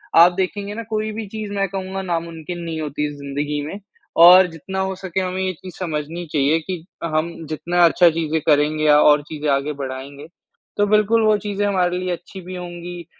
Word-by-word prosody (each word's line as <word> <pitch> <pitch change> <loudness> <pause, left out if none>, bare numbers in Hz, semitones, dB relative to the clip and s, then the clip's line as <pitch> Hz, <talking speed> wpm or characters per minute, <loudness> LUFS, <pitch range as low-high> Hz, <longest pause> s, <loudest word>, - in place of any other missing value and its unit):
आप 170 +2 +8
देखेंगे 200 +2 -3
ना 230 +2 -5
कोई 215 0 -1
भी 220 +1 -5
चीज़ 215 0 -6
मैं 195 -1 0
कहूँगा 190 0 -4
नामुमकिन 170 -1 -4
नहीं 165 -1 -4
होती 150 0 -2
ज़िन्दगी 145 +1 -3
में। 195 +7 -6 0.5
और 180 +1 +9
जितना 190 +4 -6
हो 190 0 -1
सके 190 0 -4
हमें 185 0 -2
ये 185 - 0
चीज़ 180 0 -11
समझनी 165 0 -4
चाहिए 150 +2 +3
कि, 170 0 -6 0.2
हम 165 +1 -1
जितना 175 +3 0
अच्छा 170 +1 +5
चीज़े 160 -1 -1
करेंगे 150 0 +3
या 150 -1 +6
और 150 0 +5
चीज़ें 150 -1 -3
आगे 140 +2 0
बढ़ाएँगे 135 +3 -7 0.5
तो 205 - +3
बिल्कुल 215 +2 +3
वो 215 -1 +4
चीज़ें 205 0 -2
हमारे 180 -3 +1
लिए 185 0 -2
अच्छी 180 +2 -7
भी 185 +1 -8
होंगी 175 -1 -7
175 Hz, 190 wpm, -21 LUFS, 155-190 Hz, 0.5 s, और